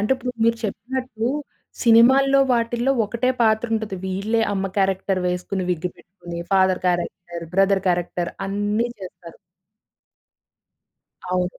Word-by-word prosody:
అంటే 210 +5 +2
ఇప్పుడు 250 -1 -4
మీరు 230 0 +3
చెప్పినట్లు 235 +2 -3 0.5
సినిమా‌ల్లో 265 +4 +6
వాటిల్లో 240 +2 +1
ఒకటే 235 +4 -1
పాత్ర 220 +1 +3
ఉంటది. 220 -3 -3
వీళ్ళే 200 +4 -1
అమ్మ 195 -1 -1
క్యారెక్టర్ 190 -1 +1
వేసుకొని 180 +1 -2
విగ్గిపెట్టుకొని, 175 0 -6
ఫాదర్ 190 -1 +3
క్యారెక్టర్, 175 -1 -2
బ్రదర్ 195 0 +3
క్యారెక్టర్ 175 0 -1 0.2
అన్ని 205 +4 -1
చేస్తారు. 175 -3 -11 1.9
అవును. 180 0 -1
200 Hz, 110 wpm, -22 LUFS, 180-230 Hz, 1.9 s, సినిమా‌ల్లో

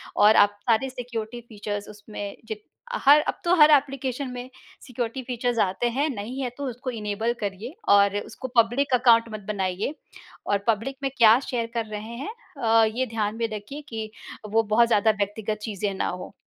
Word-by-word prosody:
और 210 +1 +6
आप 205 0 -11
सारे 235 +4 +3
सिक्योरिटी 240 -2 -6
फीचर्स 205 -1 -5
उसमें 205 -1 -7
जिब 220 - -4 0.5
हर 285 +2 +9
अब - - -2
तो 345 - +4
हर 300 +1 +9
एप्लीकेशन 275 -2 +1
में 250 0 -7 0.3
सिक्योरिटी 245 0 -4
फीचर्स 245 -1 -2
आते 195 +5 +1
हैं, 280 +6 0
नहीं 235 +2 -5
हैं 250 -2 -2
तो 285 - -4
उसको 250 +2 -6
इनेबल 220 0 -2
करिए 205 - -4 0.2
और 200 0 +5
उसको 260 - -7
पब्लिक 250 +4 -1
अकाउंट 235 -2 +5
मत 215 - -4
बनाइए। 195 +5 -2 0.5
और 205 - +3
पब्लिक 230 +5 0
में 270 - +1
क्या 230 0 +7
शेयर 235 -2 -1
कर 230 -1 -1
रहे 215 +1 -7
हैं 275 - -5 0.3
अ, 225 0 +5
ये 230 +4 -1
ध्यान 215 -1 -2
में 230 - 0
रखिए 215 +8 -7
कि 220 -2 -5 0.4
वो 225 +1 +3
बहुत 225 +2 +4
ज़्यादा 220 -1 +4
व्यक्तिगत 210 +1 -2
चीज़ें 205 -2 -2
ना - - -1
हो। 180 +2 -7
225 Hz, 180 wpm, -25 LUFS, 210-250 Hz, 0.5 s, हर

